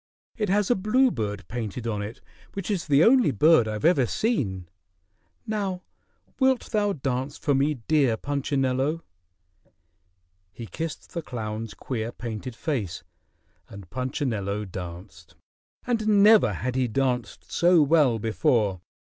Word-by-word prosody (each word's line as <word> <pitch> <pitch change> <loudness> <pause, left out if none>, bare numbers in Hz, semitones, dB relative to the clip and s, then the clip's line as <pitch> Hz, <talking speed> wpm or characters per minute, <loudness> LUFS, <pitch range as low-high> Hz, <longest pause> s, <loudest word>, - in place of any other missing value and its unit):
It 210 -4 -2
has 205 +3 +2
a - - +4
bluebird 185 - 0
painted 115 +1 -5
on 105 -3 -2
it 105 +3 -7 0.3
which 195 +1 -4
is 185 -5 -2
the 145 +1 +5
only 245 - +5
bird 140 0 +4
I've 110 +5 -3
ever 145 -8 +4
seen. 105 - -1 0.8
Now 195 -4 -3 0.6
wilt 265 -2 +2
thou 205 -2 +1
dance 135 -1 -3
for 145 - 0
me, 140 +3 +2
dear 140 -8 +3
Punchinello?" 140 +2 -1 1.5
He 115 +4 -8
kissed 155 - -6
the 170 - -3
clown's 110 -5 -5
queer 115 -3 -4
painted 115 +1 -6
face, 120 - -3 0.7
and 100 -3 -12
Punchinello 115 -6 -2
danced. 85 -3 -9 0.5
And 230 -3 -1 0.2
never 210 - +6
had 125 +7 -3
he 130 -1 +1
danced 125 -1 -2
so 175 -2 +4
well 145 -5 +3
before. 110 - +1
130 Hz, 130 wpm, -25 LUFS, 110-170 Hz, 1.5 s, never